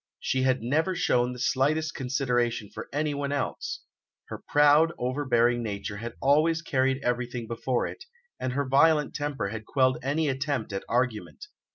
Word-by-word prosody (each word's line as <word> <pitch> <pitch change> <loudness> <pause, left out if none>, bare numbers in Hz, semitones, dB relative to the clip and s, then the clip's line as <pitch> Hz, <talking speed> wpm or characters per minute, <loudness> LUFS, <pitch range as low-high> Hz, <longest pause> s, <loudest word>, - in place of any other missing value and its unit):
She 130 - 0
had 130 -2 +1
never 160 +9 +1
shown 125 -8 +1
the 125 - -7
slightest 145 +5 +1
consideration 125 -5 -1
for 110 - -8
anyone 145 -1 -1
else; 140 -2 -3 0.5
her - - -7
proud, 150 +3 +5
overbearing 120 -2 +1
nature 105 -2 -4
had 115 +2 -6
always 160 +4 +3
carried 135 -3 0
everything 120 -1 -2
before 120 +2 -1
it, 380 - -8 0.3
and 130 -1 -2
her 140 0 -1
violent 150 +2 +4
temper 145 -8 -3
had 110 0 -7
quelled 130 -2 +2
any 150 +4 0
attempt 135 -5 -2
at 95 - -3
argument. 120 - -1
130 Hz, 155 wpm, -27 LUFS, 120-145 Hz, 0.5 s, proud